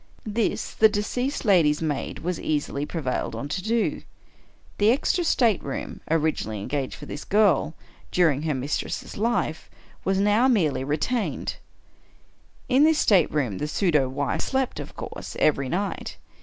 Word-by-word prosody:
This 220 +1 -1
the 220 - +5
deceased 245 +7 -2
lady's 165 -8 +4
maid 150 -4 -2
was 180 0 -2
easily 145 -1 -1
pre 165 - -4
vailed 130 -1 -2
on 140 - -4
to 185 - -2
do. 225 +3 0 0.8
The 210 +1 +5
extra 285 +8 +2
stateroom, 225 - 0
originally 155 -9 0
engaged 135 +6 -3
for - - -10
this 145 - -6
girl, 195 -6 +2 0.3
during 160 -6 +2
her 155 -2 -1
mistress' 135 +3 -3
life, 220 -7 -1 0.3
was 195 0 +1
now 210 +5 +4
merely 165 - +2
re 145 +3 0
tained. 240 +7 -2 1.1
In 265 +2 +4
this 315 0 +5
stateroom 150 - +2
the 150 - -2
pseudo 150 -6 +2
wife 140 +2 -1
slept, 265 -2 -1
of - - -8
course, - - -7
every 140 -3 +2
night. 195 +6 -3
175 Hz, 145 wpm, -25 LUFS, 145-220 Hz, 1.1 s, the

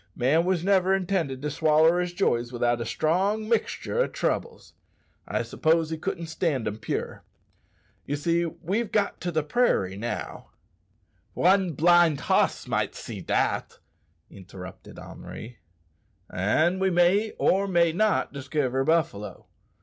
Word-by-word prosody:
"Man 150 +7 +2
wos 180 -2 0
never 190 -1 +3
intended 170 -8 -2
to 150 - -2
swaller 160 +3 +3
his 180 0 -1
joys 120 -10 0
without 120 -1 0
a 115 - -4
strong 190 - 0
mixtur' 235 - -1
o' - - +2
troubles. 470 - -3 0.5
I - - -1
s'pose 160 0 +1
he 160 - -2
couldn't 170 0 -4
stand 160 -7 -1
'em 105 0 -3
pure. 115 - -4 0.8
Ye 145 - -1
see 170 +4 0
we've 195 +8 -3
got 205 -2 0
to 175 - -2
the 155 -2 0
prairie 150 - +1
now 120 +3 -5 0.4
" - - -42
"One 185 -1 +3
blind 170 -1 +4
hoss - - +1
might - - -1
see - - -7
dat!" - - -1 0.5
interrupted 95 -1 -11
Henri. 115 +1 -10 0.7
"An' 155 - +1
we 190 0 +2
may 185 +5 +2
or 195 +1 +2
may 170 -3 +3
not 210 0 +1
diskiver 135 -1 -1
buffalo. 120 - -1
165 Hz, 140 wpm, -26 LUFS, 135-185 Hz, 0.8 s, blind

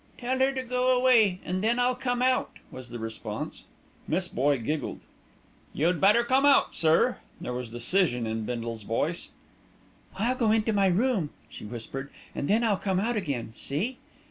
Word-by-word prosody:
"Tell 255 +1 -2
her 265 +1 +4
to 260 -1 -3
go 250 +1 +2
away, 230 -7 +4
and 185 +2 -2
then 230 +2 +2
I'll 250 +1 +3
come 250 -1 -1
out," 255 0 +1
was 130 -1 -9
the 120 - -6
response. 110 -1 -6 0.4
Miss 175 +3 0
Boye 140 +1 +1
giggled. 150 +6 -3 0.7
"You'd 170 +4 +1
better 210 +5 +5
come 260 +3 +2
out, 285 -1 +5
sir." 165 +10 +3 0.2
There 125 - -4
was 125 -1 -5
decision 120 +1 0
in 110 0 -2
Bindle's 115 -1 -4
voice. 145 - -2 0.9
"I'll 225 +6 +1
go 235 -4 +1
into 220 0 +2
my 200 -1 +3
room," 195 - +1 0.2
she - - -10
whispered, 120 +5 -6 0.2
"and 140 - -3
then 220 +4 +3
I'll 215 -4 +2
come 190 -2 0
out 235 +4 0
again, 140 - -3
see?" 195 - -3
190 Hz, 170 wpm, -27 LUFS, -, 0.9 s, better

